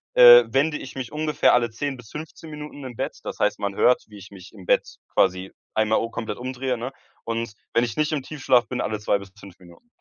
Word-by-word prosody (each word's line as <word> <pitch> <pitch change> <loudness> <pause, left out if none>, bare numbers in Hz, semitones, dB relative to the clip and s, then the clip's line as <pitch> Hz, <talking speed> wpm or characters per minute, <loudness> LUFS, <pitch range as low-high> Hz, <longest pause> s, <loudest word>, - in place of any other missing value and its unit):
äh, 120 0 +10
wende 140 +6 +1
ich 130 - -10
mich 130 -3 -5
ungefähr 150 0 +2
alle 120 -1 +3
10 135 +5 -4
bis 125 -4 -14
15 160 +1 -9
Minuten 150 -1 -9
im 125 -2 -8
Bett. - - -4
Das - - -6
heißt, - - +1
man 100 -1 -3
hört, 125 - +3
wie 105 -1 -13
ich 100 +1 -13
mich 95 0 -13
im 95 -4 -13
Bett - - +1 0.2
quasi 95 0 +1 0.2
einmal 110 0 +2
u 115 - -3
komplett 115 -1 -5
umdrehe, 130 0 -3
ne? 120 +3 -5 0.3
Und 115 -1 -3 0.2
wenn 115 - +3
ich 115 -3 -3
nicht 155 0 0
im 150 -4 -2
Tiefschlaf 130 -5 +1
bin, 125 - -3
alle 110 -1 -2
2 105 -1 +1
bis 100 -1 -12
5 95 -2 -14
Minuten. 90 - -18
120 Hz, 235 wpm, -24 LUFS, 105-135 Hz, 0.3 s, äh